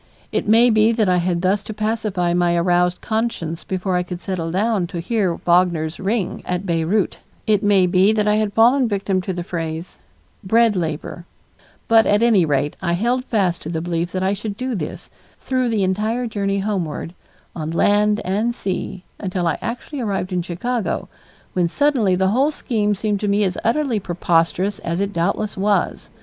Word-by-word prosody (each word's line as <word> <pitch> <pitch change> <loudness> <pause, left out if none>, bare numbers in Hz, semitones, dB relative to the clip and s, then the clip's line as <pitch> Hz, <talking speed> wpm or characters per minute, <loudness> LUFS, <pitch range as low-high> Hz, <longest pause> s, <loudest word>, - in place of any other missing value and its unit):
It - - -1
may 230 +3 +6
be 220 +1 +4
that 220 -3 +1
I 180 -1 +3
had 175 0 0
thus 195 +2 +2
to 215 - -8
pacify 215 -5 -1
my 175 -1 +2
aroused 175 +1 +2
conscience 220 -8 -2
before 185 0 -2
I - - +1
could 180 0 -6
settle 180 -4 -3
down 195 +1 0
to 175 -1 -5
hear 190 -1 0
Wagner's 170 -2 +2
"Ring" 200 0 -1
at 180 +2 -3
Beyreuth; 170 +3 0 0.3
it 210 -2 +2
may 200 -3 +4
be 185 +3 +4
that 210 -1 +1
I 210 0 +3
had 215 -1 0
fallen 245 +5 +5
a - - +1
victim 195 -2 -1
to 190 - -4
the 175 -1 -4
phrase, 165 0 -5 0.4
"bread 225 +2 +3
labor"; 170 0 -4 0.6
but 225 -1 +5
at 205 +2 +3
any 215 -7 +4
rate 145 -1 0
I 170 -2 0
held 240 +7 0
fast 190 -8 0
to 155 - -6
the 165 -1 -2
belief 170 +1 -2
that 185 0 -1
I 190 +1 +2
should 205 0 -5
do 255 +1 -3
this, 170 -9 -5 0.3
through 255 -2 0
the 215 -4 +1
entire 215 +6 0
journey 200 -3 -1
homeward, 180 -5 -3 0.4
on 155 -2 -4
land 210 +5 +2
and 215 +6 0
sea, 185 -2 -4 0.2
until 185 -2 -2
I 165 - 0
actually 250 +4 -5
arrived 195 -4 -2
in 180 - +1
Chicago 200 +7 -3 0.4
when 175 -2 +1
suddenly 250 - +2
the 190 +1 +2
whole 265 +8 +3
scheme 215 -8 -1
seemed 205 0 -1
to 210 - -2
me 205 +1 +2
as 185 -2 0
utterly 240 -1 +1
preposterous 175 +2 0
as 170 +1 -3
it 200 +1 -1
doubtless 195 +4 -1
was. 200 +1 0
195 Hz, 190 wpm, -20 LUFS, 175-220 Hz, 0.6 s, may